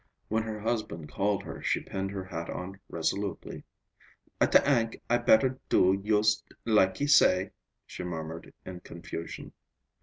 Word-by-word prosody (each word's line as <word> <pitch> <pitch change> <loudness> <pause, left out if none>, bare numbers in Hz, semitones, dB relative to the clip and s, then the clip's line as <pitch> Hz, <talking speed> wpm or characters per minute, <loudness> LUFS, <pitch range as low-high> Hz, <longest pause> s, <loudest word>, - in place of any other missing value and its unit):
When 110 +1 +1
her 110 -1 -5
husband 105 -9 -3
called 100 0 0
her, - - -8
she - - +1
pinned 95 0 -4
her 95 -1 -5
hat 85 -2 -6
on 95 +2 -6
resolutely. 85 +4 -3 0.8
"I - - +6
ta - - +7
ank 115 -5 +1
I 120 - +4
better 125 +2 +4
do 95 +2 +4
yust 105 0 +3 0.2
like 105 -4 +3
he 145 - 0
say," 95 -10 +5 0.3
she - - -7
murmured 80 -1 -6
in 90 -1 -7
confusion. 85 -1 -8
95 Hz, 150 wpm, -29 LUFS, 90-110 Hz, 0.8 s, ta